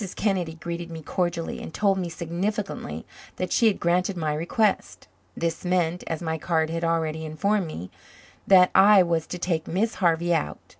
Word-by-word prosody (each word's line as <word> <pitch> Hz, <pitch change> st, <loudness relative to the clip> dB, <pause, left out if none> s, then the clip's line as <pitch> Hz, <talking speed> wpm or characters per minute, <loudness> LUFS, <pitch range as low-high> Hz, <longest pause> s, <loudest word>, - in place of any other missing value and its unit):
Kennedy 185 Hz, -6 st, -1 dB
greeted 170 Hz, +1 st, -6 dB
me 165 Hz, -1 st, -8 dB
cordially 175 Hz, +1 st, -2 dB
and -, -, -7 dB
told 195 Hz, +1 st, +1 dB
me 175 Hz, -2 st, -3 dB
significantly 185 Hz, +6 st, -4 dB, 0.3 s
that -, -, -3 dB
she 235 Hz, -, +4 dB
had 210 Hz, -, +1 dB
granted 180 Hz, +2 st, +1 dB
my 155 Hz, -3 st, -1 dB
request. 160 Hz, -, -1 dB, 0.3 s
This 165 Hz, -1 st, -2 dB
meant, 180 Hz, -1 st, 0 dB
as 165 Hz, +1 st, -3 dB
my 160 Hz, -1 st, -2 dB
card 160 Hz, 0 st, 0 dB
had 165 Hz, 0 st, -3 dB
already 160 Hz, -1 st, 0 dB
informed 185 Hz, +5 st, 0 dB
me, 90 Hz, -, -7 dB, 0.6 s
that 185 Hz, -2 st, +6 dB
I 200 Hz, -1 st, +7 dB
was 165 Hz, -2 st, -1 dB
to 180 Hz, -, -5 dB
take 170 Hz, -3 st, -2 dB
Miss 210 Hz, +6 st, 0 dB
Harvey 170 Hz, 0 st, +2 dB
out. 75 Hz, -, -1 dB
170 Hz, 170 wpm, -25 LUFS, 160-185 Hz, 0.6 s, I